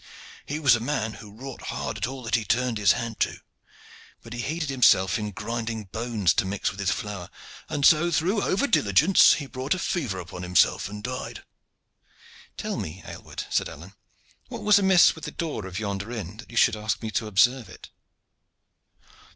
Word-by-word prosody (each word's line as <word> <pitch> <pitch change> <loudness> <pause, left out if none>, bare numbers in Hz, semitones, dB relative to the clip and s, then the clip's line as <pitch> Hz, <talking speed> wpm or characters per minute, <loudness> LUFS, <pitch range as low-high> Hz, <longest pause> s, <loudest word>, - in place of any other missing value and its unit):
He 150 - -3
was 140 -6 +5
a - - -2
man 115 -3 -2
who 105 -2 -12
wrought 130 +4 -9
hard - - -3
at 105 +2 -1
all 130 0 -7
that 115 - -6
he 115 - +3
turned 120 +1 0
his 100 -3 +5
hand 115 -2 -5
to; - - 0 0.9
but 115 - -9
he 120 - -4
heated 155 +3 -3
himself 100 -7 +4
in 105 0 -3
grinding 115 +1 -4
bones 105 -3 0
to 115 - +1
mix 100 +1 -2
with 95 - -12
his 100 -2 0
flour, 100 -3 -4 0.4
and 145 -2 0
so 165 +2 +5
through 175 +6 +1
over 200 +9 +1
diligence 160 - +5
he 145 - -3
brought 135 +5 -2
a - - -5
fever 135 - -2
upon 90 0 -8
himself 90 +1 +2
and 105 0 -8
died." 125 +2 -5 1.1
"Tell - - -3
me, 80 +3 -6
Aylward," - - -7
said - - +1
Alleyne, 90 +6 -11 0.5
"what - - -7
was 210 -1 +6
amiss 190 -3 +6
with 160 - -9
the - - -4
door 150 - -4
of 95 0 -7
yonder 100 +1 -4
inn 105 -4 -6
that 120 - -12
you 115 - -8
should 120 -2 +5
ask 110 +1 -3
me 110 - -3
to 110 +2 -1
observe 120 +2 +2
it." - - -13
115 Hz, 190 wpm, -25 LUFS, 100-135 Hz, 1.1 s, was